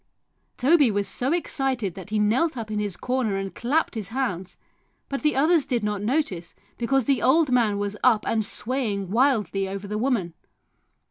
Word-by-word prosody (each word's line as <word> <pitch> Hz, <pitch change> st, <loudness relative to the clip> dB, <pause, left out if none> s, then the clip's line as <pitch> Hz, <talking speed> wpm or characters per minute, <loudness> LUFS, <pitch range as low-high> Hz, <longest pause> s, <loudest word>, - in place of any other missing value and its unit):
Toby 285 Hz, 0 st, +4 dB
was 205 Hz, -1 st, -1 dB
so 260 Hz, +3 st, -1 dB
excited 270 Hz, -, -1 dB
that 190 Hz, +2 st, -10 dB
he 215 Hz, -, -1 dB
knelt 250 Hz, +9 st, +1 dB
up 220 Hz, -2 st, -5 dB
in 210 Hz, -, -1 dB
his 205 Hz, -4 st, -3 dB
corner 250 Hz, -5 st, -1 dB
and 195 Hz, 0 st, -4 dB
clapped 285 Hz, +8 st, 0 dB
his 215 Hz, -5 st, -3 dB
hands, 195 Hz, -8 st, -3 dB, 0.5 s
but 275 Hz, -, -3 dB
the 300 Hz, -2 st, +1 dB
others 310 Hz, +2 st, +3 dB
did 240 Hz, -4 st, -1 dB
not 210 Hz, -1 st, -2 dB
notice 210 Hz, -, -2 dB, 0.2 s
because 260 Hz, +1 st, +1 dB
the 275 Hz, -3 st, +1 dB
old 295 Hz, +1 st, +3 dB
man 230 Hz, -5 st, +2 dB
was 205 Hz, 0 st, -2 dB
up 230 Hz, -4 st, +4 dB
and 220 Hz, -1 st, +1 dB
swaying 210 Hz, -4 st, -2 dB
wildly 210 Hz, -, +1 dB
over 195 Hz, +1 st, -6 dB
the 210 Hz, +1 st, -3 dB
woman. 225 Hz, -9 st, 0 dB
230 Hz, 180 wpm, -24 LUFS, 205-270 Hz, 0.5 s, Toby